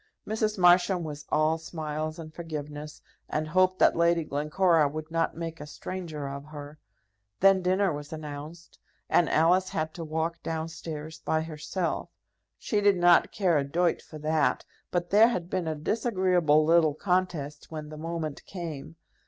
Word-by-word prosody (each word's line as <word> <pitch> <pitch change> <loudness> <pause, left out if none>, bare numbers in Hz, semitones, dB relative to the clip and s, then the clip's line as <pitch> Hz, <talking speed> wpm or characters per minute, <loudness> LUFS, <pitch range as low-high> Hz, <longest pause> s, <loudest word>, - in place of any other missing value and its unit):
Mrs. 215 0 -1
Marsham 180 0 +4
was 150 -1 -7
all 155 +1 +2
smiles 155 -1 -4
and 155 -2 -9
forgiveness, 150 -2 -7 0.3
and 155 +1 -1
hoped 185 +2 +3
that - - +4
Lady 170 0 +3
Glencora 150 +2 +2
would 155 +2 -6
not 165 -1 0
make 165 -2 -5
a 150 - -7
stranger 155 -2 -6
of 140 0 -6
her. 150 0 -10 0.6
Then 195 0 +5
dinner 185 0 +2
was 145 0 -7
announced, 155 +2 -8 0.3
and 170 - +4
Alice 180 +4 +3
had 155 0 -2
to 170 - -6
walk 160 +1 -2
down 160 0 -3
stairs 160 -1 -7
by 160 0 0
herself. 165 +3 -3 0.5
She 210 -2 -1
did 200 -2 +4
not 175 -1 +5
care 180 -7 +2
a - - 0
doit 170 +5 0
for 155 - -11
that, 155 0 +1 0.2
but 175 -1 -2
there 215 +3 +7
had 180 -7 -3
been 185 -3 -1
a 160 - -1
disagreeable 180 -4 +2
little 160 -2 +4
contest 175 -5 -1
when 155 -2 -6
the 155 - -8
moment 160 -2 -4
came. 160 -4 -7
160 Hz, 160 wpm, -28 LUFS, 150-180 Hz, 0.6 s, there